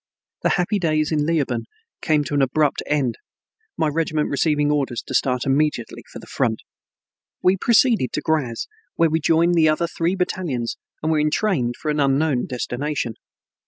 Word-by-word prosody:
The - - +2
happy 195 +3 0
days 155 -3 +1
in 150 -1 +1
Leoben 135 -8 0 0.4
came 155 -2 +2
to 145 - -6
an 145 - +2
abrupt 140 +2 +1
end, 135 -6 0 0.6
my 160 - +1
regiment 155 0 -1
receiving 150 0 +1
orders 135 -5 -1
to - - -8
start 125 -2 +1
immediately 140 -4 0
for - - -8
the - - -11
front. 115 -5 -1 0.8
We 185 +1 +5
proceeded 225 - +3
to - - -1
Graz, 140 -8 -1 0.3
where 165 -2 +3
we 160 - +2
joined 165 +3 +3
the 160 -2 +4
other 155 +2 +1
three 170 +2 -1
battalions 170 -10 -2 0.3
and 160 - +1
were 155 - +2
entrained 150 - 0
for 155 - -1
an 150 - -1
unknown 140 -1 +1
destination. 125 0 -3
150 Hz, 165 wpm, -22 LUFS, 135-165 Hz, 0.8 s, We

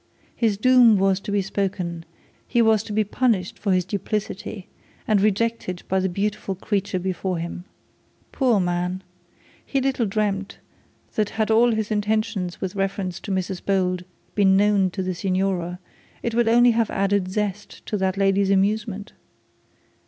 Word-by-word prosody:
His 220 -4 +1
doom 245 -1 +6
was 195 0 +2
to 200 - -6
be 200 -1 +1
spoken; 180 -4 -3 0.4
he 240 - +1
was 220 -2 +4
to - - -7
be 215 +1 +2
punished 210 -3 0
for 205 - 0
his 185 -1 +2
duplicity, 200 0 -4 0.4
and 210 -2 +3
rejected 210 -3 0
by 190 - +1
the 190 0 0
beautiful 200 +1 -2
creature 200 0 -2
before 185 0 -2
him. 170 +2 -5 0.7
Poor 250 -6 +2
man. 180 +1 -1 0.6
He 275 - -1
little 260 -4 0
dreamt 200 -1 -2 0.6
that 210 -2 0
had 220 0 +1
all 235 +2 +5
his 220 0 -2
intentions 210 -3 -1
with 190 -1 -3
reference 195 -2 -2
to 205 - -6
Mrs 190 -1 -2
Bold 185 -2 0 0.3
been 190 -2 +4
known 200 -2 +3
to 190 +1 -4
the 185 0 -2
signora, 185 -1 -1 0.5
it 235 - -1
would 235 0 +2
only 240 +1 +6
have 230 -1 +1
added 195 -1 0
zest 210 0 -4
to - - -3
that 190 0 0
lady's 195 0 +2
amusement. 205 +1 0
200 Hz, 155 wpm, -23 LUFS, 185-215 Hz, 0.7 s, doom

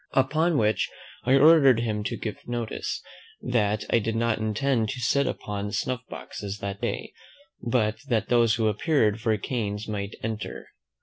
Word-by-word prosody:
Upon 155 +5 +2
which 110 0 +2 0.4
I 130 +2 +5
ordered 140 -4 +7
him 105 -3 -1
to - - -2
give 110 - -6
notice, 120 -2 -3 0.4
that 105 -4 0
I 115 - +5
did 115 +1 -2
not 115 -1 +1
intend 110 +1 0
to 135 - -4
sit 140 +3 +2
upon 105 0 -4
snuff 125 -2 -1
boxes 100 0 -6
that 100 -1 -5
day; - - -3 0.5
but 115 -3 +1
that 110 -5 +1
those 120 -2 +4
who 110 -1 +1
appeared 110 -1 +2
for 110 -1 +2
canes 105 -1 -3
might 100 -1 -4
enter. 110 -1 -5
115 Hz, 160 wpm, -26 LUFS, 105-125 Hz, 0.5 s, ordered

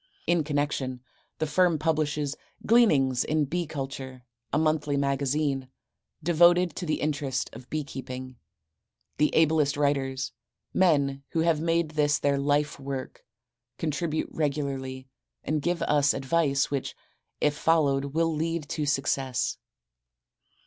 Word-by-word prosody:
In 170 -1 +2
connection, 145 -4 -2 0.4
the 160 - 0
firm 165 +2 +3
publishes, 150 -2 0 0.3
"Gleanings 140 - +4
in 155 -1 +1
Bee 170 +4 -2
Culture," 135 -3 -6 0.3
a - - +1
monthly 155 -2 +1
magazine, 140 0 0 0.6
devoted 175 +1 +4
to 175 - -4
the 155 - 0
interest 145 -3 -2
of 125 - -11
bee 155 -1 -2
keeping. 130 -2 -7 0.8
The 150 - +4
ablest 155 -3 +3
writers, 135 -2 0 0.4
men 140 -7 +2
who 165 - +2
have 165 -2 +2
made 165 -1 +1
this 145 -1 +2
their 140 -1 +1
life 145 +1 +1
work, 135 -1 -6 0.5
contribute 155 0 -2
regularly 135 -3 -3 0.4
and 155 0 -1
give 175 +3 0
us 145 -1 +3
advice 140 0 +1
which, 140 -2 -3 0.4
if 150 -1 +2
followed 145 -4 +2
will 165 +3 0
lead 160 0 -2
to 150 -2 -2
success. 135 -2 0
145 Hz, 125 wpm, -27 LUFS, 135-160 Hz, 0.8 s, Gleanings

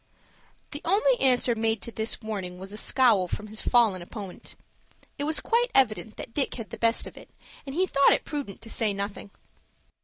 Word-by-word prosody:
The 290 - -5
only 430 +8 +3
answer 250 -2 +3
made 225 -1 0
to 235 - -6
this 220 0 -3
warning 195 -5 -5
was 190 +2 -9
a - - -6
scowl 220 -6 +3
from 210 - -4
his 215 +1 -4
fallen 220 -7 +3
opponent. 195 +1 -9 0.6
It 285 - -1
was 310 +1 +3
quite 485 +1 +1
evident 220 -4 +2
that 230 - -8
Dick 280 0 0
had 230 -3 -7
the - - -7
best 230 0 +2
of - - -11
it, - - -12 0.4
and 270 - -5
he 370 +3 +3
thought 280 -6 +4
it - - 0
prudent 280 -10 -5
to 225 - -9
say 215 -3 0
nothing. 200 +1 -5
230 Hz, 195 wpm, -27 LUFS, 210-275 Hz, 0.6 s, thought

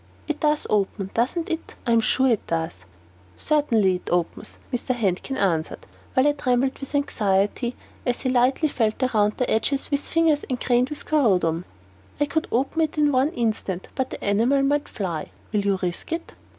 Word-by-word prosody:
It 305 -1 -2
does 300 0 +1
open, 195 -2 0
doesn't 260 +9 0
it? 325 0 -4
I 240 - +1
am 230 -1 +5
sure 260 +2 +2
it 235 -5 +1
does." 160 - -3 0.5
"Certainly 230 -11 +2
it - - -10
opens," 175 -1 -1 0.2
Mr. 245 +1 -1
Handkin 220 +4 -1
answered, 170 -7 0 0.3
while 260 +2 +5
I - - +5
trembled 260 -2 0
with 275 +1 -6
anxiety 215 -3 +1 0.3
as 245 -1 -1
he 260 - 0
lightly 255 +5 +3
felt 225 -4 0
it 255 - 0
round 210 -1 +2
the 250 - 0
edges 275 +7 0
with 285 0 0
fingers 325 -3 +2
engrained 250 0 +1
with 300 - -4
corundum. 180 - +2 0.5
"I 290 - +3
could 315 +2 -1
open 275 +7 +1
it 315 -1 0
in 295 -1 +4
one 265 +2 +3
instant, 215 - -2
but 260 -1 -1
the - - -6
enamel 235 +7 +3
might 290 +1 +1
fly. 175 -6 -4 0.2
Will 210 - +2
you 200 -1 +2
risk 180 - -4
it?" 330 0 -5
245 Hz, 180 wpm, -24 LUFS, 200-285 Hz, 0.5 s, am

